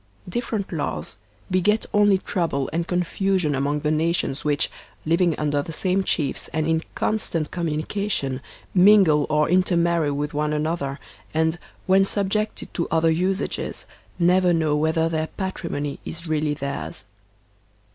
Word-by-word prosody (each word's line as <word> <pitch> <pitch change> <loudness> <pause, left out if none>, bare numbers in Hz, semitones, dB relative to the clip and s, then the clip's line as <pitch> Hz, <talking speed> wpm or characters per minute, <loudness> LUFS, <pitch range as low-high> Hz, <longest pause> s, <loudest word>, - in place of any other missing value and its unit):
Different 215 0 -3
laws 145 - -3 0.3
beget 205 +4 +2
only 205 -1 +5
trouble 165 -8 -1
and 170 +1 -1
confusion 180 -2 0
among 140 +2 0
the 150 - 0
nations 155 -2 0
which, 145 -1 +1 0.3
living 165 +1 +2
under 145 -1 0
the 165 - -7
same 185 +4 +1
chiefs 150 -6 -1
and 155 -1 -1
in 160 0 +2
constant 170 -8 0
com 175 -2 -2
munication, 155 -3 -1 0.3
mingle 185 -6 +6
or 150 0 +3
intermarry 170 -3 +2
with 145 +1 -2
one 150 +1 0
another, 150 -2 -2 0.4
and, 160 +1 +1 0.3
when 190 +1 +5
subjected 205 +2 -1
to 170 - -1
other 165 0 +3
usages, 185 +4 -1 0.3
never 180 0 +4
know 160 -3 +2
whether 160 +2 +2
their 160 -1 -1
patrimony 165 -7 -4
is 170 +1 -6
really 155 -2 0
theirs. 140 -1 -5
165 Hz, 135 wpm, -23 LUFS, 150-185 Hz, 0.4 s, mingle